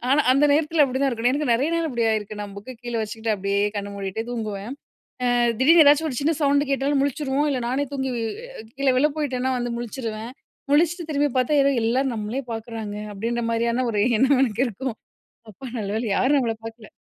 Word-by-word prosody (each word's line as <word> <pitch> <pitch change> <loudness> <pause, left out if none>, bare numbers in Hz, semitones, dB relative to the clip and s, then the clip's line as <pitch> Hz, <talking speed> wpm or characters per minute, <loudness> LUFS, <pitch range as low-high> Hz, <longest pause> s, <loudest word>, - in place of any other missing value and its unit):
ஆனா, 280 +3 +5
அந்த 275 +3 +4
நேரத்தில 310 +1 +3
அப்பிடிதான் 270 +1 0
இருக்கணும். 240 +1 +1
எனக்கு 290 -1 0
நெறைய 265 +6 +1
நேரம் 330 -3 -1
இப்டி 235 -1 +1
ஆயிருக்கு. 215 -1 -3
நான் 205 -1 -7
புக்க 235 +6 -8
கீழே 240 -1 -4
வச்சுக்கிட்டு 220 +1 -3
அப்டியே 200 +1 0 0.2
கண்ண 200 0 -3
மூடிட்டே 200 +3 -4
தூங்குவேன். 215 -1 -4 0.6
அ - - +2 0.2
திடீர்னு 320 +4 +7
ஏதாச்சும் 295 +2 +5
ஒரு 250 - -4
சின்ன 320 +3 +2
சவுண்டு 285 0 +2
கேட்டாலும் 275 +1 +1
முழிச்சுருவோம், 285 +1 0
இல்ல 260 - -1
நானே 270 +3 0
தூங்கி 265 -2 -2 0.5
அ - - -9
கீழ 275 0 0
விழப் 295 +2 +1
போயிட்டேன்னா, 260 -3 -1
வந்து 240 -1 -2
முழிச்சுருவேன். 230 -1 -5 0.4
முழிச்ட்டு 335 +3 +2
திரும்பி 290 0 +2
பாத்தா, 255 +3 +1
ஏதோ 275 - +3
"எல்லாரும் 255 +2 +1
நம்ளயே 220 +5 -3
பாக்குறாங்க" 225 -2 -6 0.2
அப்பிடின்ற 230 +4 -2
மாதிரியான 235 +2 0
ஒரு 210 -2 0 0.2
எண்ணம் 265 +2 +4
எனக்கு 240 -1 +1
இருக்கும். 235 +2 -5 0.5
அப்பா! 215 +6 -11
நல்லவேள 215 +2 -2
யாரும் 280 +3 +3
நம்மள 230 -3 -1
பாக்கல! 225 -1 -10
250 Hz, 185 wpm, -23 LUFS, 225-280 Hz, 0.6 s, திடீர்னு